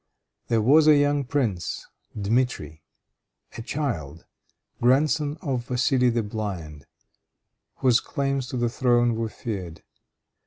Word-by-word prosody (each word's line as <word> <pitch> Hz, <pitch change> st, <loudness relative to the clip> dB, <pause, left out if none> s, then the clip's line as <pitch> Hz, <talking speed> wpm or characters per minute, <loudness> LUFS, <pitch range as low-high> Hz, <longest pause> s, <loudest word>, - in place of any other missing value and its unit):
There 115 Hz, -2 st, +1 dB
was 150 Hz, +6 st, +5 dB
a 155 Hz, -, +8 dB
young 145 Hz, 0 st, +2 dB
prince, 115 Hz, -, -2 dB, 0.3 s
Dmitri, 100 Hz, -, -1 dB, 0.7 s
a -, -, -6 dB
child, 115 Hz, -, -4 dB, 0.6 s
grandson 145 Hz, +4 st, +2 dB
of 130 Hz, -4 st, -2 dB
Vassili 125 Hz, 0 st, +2 dB
the 115 Hz, -1 st, 0 dB
blind, 95 Hz, -9 st, -6 dB, 0.9 s
whose 125 Hz, -2 st, +3 dB
claims 135 Hz, -2 st, -2 dB
to 130 Hz, -, -4 dB
the 120 Hz, 0 st, +1 dB
throne 120 Hz, 0 st, +2 dB
were 115 Hz, 0 st, -2 dB
feared. 95 Hz, -9 st, -6 dB
120 Hz, 115 wpm, -25 LUFS, 105-135 Hz, 0.9 s, a